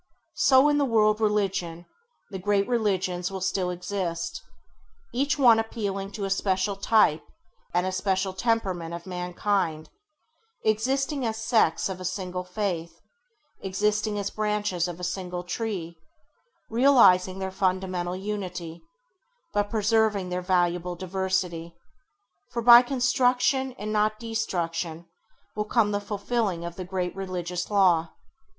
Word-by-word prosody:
So 265 +1 +5
in 295 0 +3
the - - +3
World 215 -4 +3
Religion, 195 -5 -1 0.5
the 190 - -5
great 200 +1 +1
religions 190 -6 0
will 195 -1 -5
still 185 0 -1
exist, 180 -2 -4 0.7
each 275 +5 +1
one 240 -5 +6
appealing 200 -3 -3
to 200 - -3
a - - -3
special 195 0 0
type 195 -6 +3 0.5
and 175 +1 +1
a - - 0
a - - -4
special 190 0 -1
temperament 190 -6 -1
of 170 0 -9
mankind, 180 -3 -2 0.7
existing 265 +6 0
as 220 -2 -1
sects 220 -7 +2
of 185 -1 -6
a - - -5
single 180 0 -3
Faith, 180 -3 -4 0.6
existing 210 +2 0
as 200 0 -2
branches 210 -5 -1
of 175 0 -7
a - - -8
single 180 0 -4
tree, 180 -4 -4 0.7
realizing 225 -7 +5
their 190 0 -4
fundamental 185 -2 -1
unity, 185 -4 -5 0.7
but 205 0 0
preserving 215 -3 +1
their 180 0 -2
valuable 180 -1 0
diversity; 180 -2 -2 0.7
for 235 -1 -3
by 240 0 +10
construction 255 +1 +1
and 215 -3 -5
not 215 0 +2
by 225 +2 -9
destruction 170 -6 -3 0.5
will 210 0 -1
come 215 -1 +2
the 205 0 -1
fulfilling 205 -3 -2
of 170 0 -6
the 185 - -6
great 180 -1 -3
religious 180 -2 -4
law. 180 -5 +3
195 Hz, 135 wpm, -26 LUFS, 180-215 Hz, 0.7 s, by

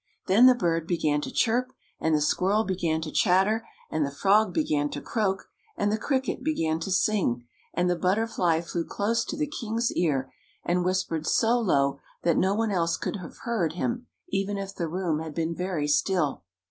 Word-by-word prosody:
Then 225 +7 +6
the 255 - +7
bird 165 -7 0
began 155 -4 +1
to - - -5
chirp, 250 +2 +1 0.3
and 160 -1 +2
the 150 - +1
squirrel 195 +8 +2
began 175 -5 -1
to 155 -1 -5
chatter, 205 +4 +2 0.2
and 155 - +1
the 140 - -1
frog 200 +7 +3
began 150 -3 0
to 145 - -5
croak, 195 +2 -1 0.3
and 205 - +1
the 215 - +1
cricket 265 0 -1
began 165 - 0
to 165 - -4
sing, 185 - +1 0.3
and 180 +1 0
the 180 - +2
butterfly 180 -3 +1
flew 170 0 -3
close 225 +6 0
to 315 - -5
the 305 - +1
king's 235 -5 -2
ear 135 -6 0 0.3
and 180 +1 +1
whispered 180 -4 -1
so 235 +2 +3
low 140 -10 +1 0.2
that 170 - +3
no 190 +2 +2
one 225 0 0
else 170 -3 +1
could - - -3
have 180 -3 -10
heard 200 -10 0
him, 240 +7 -2 0.2
even 195 +1 -1
if 195 0 -5
the 170 -4 -3
room 170 -3 -1
had 160 -2 -6
been 165 0 -1
very 175 -4 -2
still. 150 - +1
180 Hz, 190 wpm, -27 LUFS, 160-215 Hz, 0.3 s, the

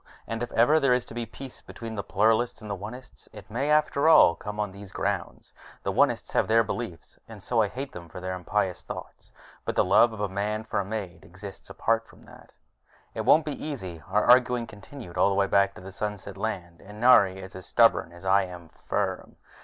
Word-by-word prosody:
And 115 0 -4
if 120 - -3
ever 135 +8 +5
there 135 -4 +4
is 125 - -2
to - - -11
be 120 -1 -4
peace 130 +3 -10
between 115 -1 -8
the 105 - -3
Pluralists 110 +4 +1
and 105 -2 -8
the - - -1
Onists, 115 +7 -10
it 105 -1 -13
may, 135 +6 -1
after 150 0 +3
all, 120 - +8
come 105 +4 -7
on 105 -2 -1
these 100 0 -11
grounds. - - -3 0.3
The - - -1
Onists - - +2
have - - +2
their 115 +1 +4
beliefs, 110 -6 -6
and 105 -4 -11
so 120 -2 +2
I 105 - +2
hate 135 +6 -6
them 85 -4 -10
for - - -8
their 95 0 -4
impious 90 +1 -1
thoughts. - - -9 0.3
But - - -3
the - - +4
love 100 +5 +5
of 110 - -9
a 105 - 0
man 105 +3 -2
for 110 - -2
a - - 0
maid 100 -4 -5
exists 90 +5 -11
apart 115 0 0
from - - -18
that. - - -16 0.6
It - - -4
won't 155 0 +5
be 150 - -5
easy. 95 - -6
Our 105 +2 +2
arguing 125 -1 +5
continued 105 -1 -10
all - - +5
the 100 - 0
way 100 0 +3
back 100 0 +2
to - - -11
the 95 +1 -9
Sunset 100 -1 -5
Land, 95 -5 -5
and 105 +2 -11
Nari 100 -6 +6
is 95 -1 -10
as 95 - -9
stubborn 115 -7 +4
as 85 +2 -13
I 100 +1 +4
am 90 -2 -10
firm. - - -3
105 Hz, 225 wpm, -27 LUFS, 95-120 Hz, 0.6 s, all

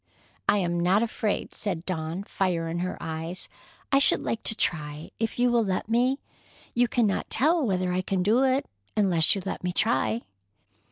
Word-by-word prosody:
"I - - +5
am 175 -3 0
not 185 +5 +3
afraid," 220 -2 -2
said 180 -5 -3
Dawn, 165 +1 -3
fire 180 -5 -1
in 165 +1 -3
her 185 +1 -2
eyes. 165 +2 -5 0.4
"I 275 - +6
should 280 - +3
like 225 - -2
to 220 - +2
try, 150 -5 -2
if 225 0 -2
you 245 0 +3
will 235 -1 +3
let 195 +1 -2
me. 250 +4 +2 0.5
You 245 +1 +3
cannot 225 -5 +1
tell 315 +6 +3
whether 185 -5 0
I 185 - +1
can 185 0 -1
do 220 +6 +3
it 270 +1 +2 0.3
unless 180 -5 +4
you 195 - -4
let 190 - -4
me 180 - 0
try." 115 -8 +1
190 Hz, 180 wpm, -27 LUFS, 170-230 Hz, 0.5 s, I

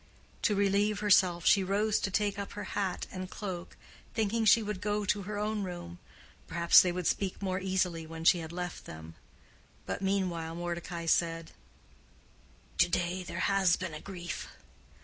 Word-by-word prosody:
To 210 - +2
relieve 200 +1 +2
herself 185 -5 +4
she 195 - +5
rose 205 +3 +1
to - - -1
take 205 0 0
up 200 - -5
her 205 - -5
hat 195 -3 -1
and 185 -1 -6
cloak, 185 -5 -6 0.4
thinking 220 +1 +1
she 220 +1 +6
would 210 -3 -4
go 210 0 -1
to 200 +1 +1
her 205 +2 -5
own 210 0 -1
room: 175 -2 -6 0.5
perhaps 170 0 +6
they 180 - +1
would 180 0 -4
speak 195 +2 0
more 190 -1 -1
easily 185 -3 -1
when 160 0 -7
she 175 +1 +5
had 160 -1 -6
left 180 0 -5
them. 80 +1 -9 0.7
But - - -4
meanwhile 180 -4 -1
Mordecai 175 0 -4
said, 165 0 +1 1.3
"To 175 - +5
day 175 +1 0
there 180 - -5
has 195 -3 +3
been 185 -3 -5
a 155 - -7
grief. 175 -3 -6
185 Hz, 170 wpm, -31 LUFS, 175-200 Hz, 1.3 s, she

